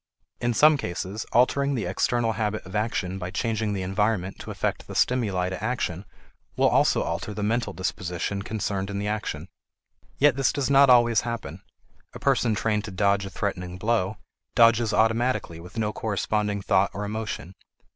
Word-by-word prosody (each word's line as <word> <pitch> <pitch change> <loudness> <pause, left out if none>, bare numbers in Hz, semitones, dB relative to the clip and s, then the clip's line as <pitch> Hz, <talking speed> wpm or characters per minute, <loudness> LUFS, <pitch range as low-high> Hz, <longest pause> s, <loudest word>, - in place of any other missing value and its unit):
In 120 -1 0
some 155 +3 +6
cases, 95 -1 -4
altering 140 +3 +3
the 115 - -2
external 115 +6 +1
habit 110 -2 -2
of 95 +3 -9
action 105 -3 -1
by 90 -1 -4
changing 110 +1 -1
the 95 -2 -2
environment 95 0 -1
to - - -8
affect - - -3
the - - -8
stimuli 100 -8 +1
to 95 - -5
action 100 -7 -2 0.5
will - - +4
also - - +3
alter 85 +5 -4
the 105 - -3
mental 115 +3 0
disposition 95 +1 -3
concerned 100 -2 -3
in 100 - -4
the 100 +1 -2
action. 105 0 -3 0.7
Yet 145 -2 +4
this 135 -2 +2
does 140 -1 -1
not 140 0 +6
always 120 -3 +5
happen; 115 -1 -5 0.5
a - - -8
person 125 -5 +2
trained 105 -1 0
to 105 - -7
dodge 100 +1 +1
a - - -7
threatening 90 -2 -4
blow, 105 -1 0 0.4
dodges 115 -1 +5
automatically 110 -5 +1
with 90 +7 -12
no 105 -1 0
corresponding 105 -1 -1
thought 95 -1 +3
or 105 +1 -3
emotion. 105 -4 -5
105 Hz, 170 wpm, -25 LUFS, 95-115 Hz, 0.7 s, some